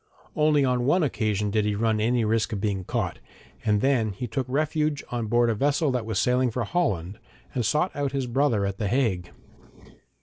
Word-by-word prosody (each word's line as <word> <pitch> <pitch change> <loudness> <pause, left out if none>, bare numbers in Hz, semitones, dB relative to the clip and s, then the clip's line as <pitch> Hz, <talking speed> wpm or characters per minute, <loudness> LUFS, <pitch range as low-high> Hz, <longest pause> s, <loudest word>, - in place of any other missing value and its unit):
Only 150 -2 +3
on 125 -1 +1
one 175 +5 +3
occasion 105 -7 0
did 110 0 +2
he 105 0 0
run 110 0 +1
any 120 +1 +2
risk 110 +1 +1
of 100 - -2
being 100 -2 -1
caught, - - -2 0.4
and 105 -2 +2
then 120 -6 +2
he 110 +7 -5
took 130 +2 -3
refuge 150 +1 0
on 120 -2 -2
board 120 +2 +3
a 115 - +2
vessel 145 +5 +1
that 125 -3 -2
was 110 -3 -2
sailing 125 +3 +2
for 120 +2 -2
Holland, 105 - -1 0.3
and 125 - -1
sought 150 - 0
out 140 -1 -1
his 135 -1 -1
brother 120 -4 +1
at 100 0 -4
the 105 - 0
Hague. 95 -7 0
120 Hz, 200 wpm, -25 LUFS, 105-140 Hz, 0.4 s, Only